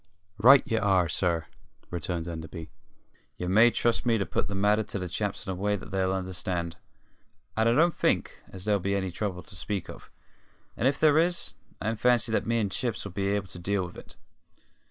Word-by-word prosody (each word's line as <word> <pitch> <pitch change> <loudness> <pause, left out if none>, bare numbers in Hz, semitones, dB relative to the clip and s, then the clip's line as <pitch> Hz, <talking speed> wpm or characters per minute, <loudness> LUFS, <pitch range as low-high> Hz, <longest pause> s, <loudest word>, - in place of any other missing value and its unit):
"Right 135 +6 +8
ye 115 -5 0
are, 95 -4 +3
sir," 85 -1 0 0.5
returned 85 0 -3
Enderby; 80 -1 -7 0.7
"ye 90 - -4
may 110 +6 +6
trust 120 0 0
me 115 -2 +3
to 100 - -1
put - - -1
the 100 - -4
matter 105 +2 +3
to 105 - -5
the 90 -1 -3
chaps 100 +4 -3
in 95 - -3
a - - -3
way 105 +3 0
that 100 - -8
they'll 95 -1 +1
understand; 90 -2 -3 0.8
and 110 +1 +3
I - - +4
don't 170 +4 +4
think - - 0
as 95 -1 -9
there'll 105 -1 +2
be 100 +2 -1
any 95 -2 -1
trouble 90 -1 -3
to 100 - -14
speak 95 +1 -4
of. - - -13 0.7
And 125 - +1
if 140 +1 +1
there 155 0 +5
is, 175 +1 0 0.3
I 110 - -1
fancy 120 0 +2
that 110 - 0
me 115 0 +2
and 105 -4 0
Chips 120 +1 -2
'll 100 - -6
be 100 +2 -2
able 100 0 0
to 90 - -8
deal 95 +1 0
with 90 - -10
it." - - -12
100 Hz, 210 wpm, -28 LUFS, 90-110 Hz, 0.8 s, Right